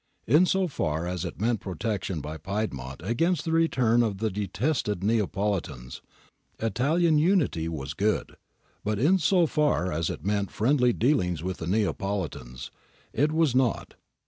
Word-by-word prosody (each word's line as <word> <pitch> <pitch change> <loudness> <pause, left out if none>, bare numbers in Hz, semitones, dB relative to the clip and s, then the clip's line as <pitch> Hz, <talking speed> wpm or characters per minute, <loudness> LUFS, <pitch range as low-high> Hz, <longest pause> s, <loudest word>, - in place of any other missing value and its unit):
In 155 - +5
so 190 0 +2
far 80 - -2
as 90 0 -3
it 85 - -7
meant 115 +1 +1
protection 95 -2 -3
by 75 +2 -6
Piedmont 75 -10 -4
against 165 - 0
the 165 - -1
return 130 -8 +3
of 110 -4 0
the 110 +1 -1
detested 105 - -1
Neapoli 105 -2 +1
tans, 65 -5 -10 0.6
Italian 150 - +2
Unity 150 - +2
was 70 -3 -5
good; 105 +6 -1 0.5
but 105 0 -1
in 165 - +3
so 175 +1 +3
far 150 - +1
as 80 +1 -1
it 75 - -6
meant 100 -1 0
friendly 125 +2 +2
dealings 90 - +1
with 95 0 -3
the 80 - -6
Neapolitans, 95 - -2 0.4
it 145 +5 +2
was 160 -4 +2
nought. 130 -2 0
105 Hz, 150 wpm, -27 LUFS, 90-140 Hz, 0.6 s, In